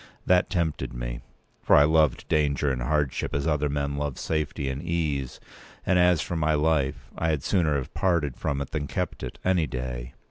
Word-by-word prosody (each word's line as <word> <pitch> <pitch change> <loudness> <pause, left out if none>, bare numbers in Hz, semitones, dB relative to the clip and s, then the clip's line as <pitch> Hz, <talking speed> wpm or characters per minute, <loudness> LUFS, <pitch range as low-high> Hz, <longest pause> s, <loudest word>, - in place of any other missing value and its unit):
That 90 0 +3
tempted 85 -8 -1
me. - - -4 0.4
For - - +4
I 70 - +8
loved 75 -2 +2
danger 75 -2 +1
and 65 -2 -2
hardship 70 +2 0
as 70 - -1
other 75 -2 +1
men 70 0 -2
love 70 -2 -3
safety 75 -2 -2
and 65 +1 -3
ease; 80 -6 -2 0.5
p. - - 0
209and 90 - +5
as 90 -2 +4
for 85 - -4
my 80 -1 +2
life, 75 -2 0
I 80 - 0
had 75 -4 0
sooner 85 -7 +2
have 70 -2 -3
parted 85 -8 +1
from 70 -1 -2
it 70 - -5
than 75 -2 -2
kept - - -3
it, - - -6
any 90 -4 +2
day. 60 -1 -5
75 Hz, 200 wpm, -26 LUFS, 70-80 Hz, 0.5 s, I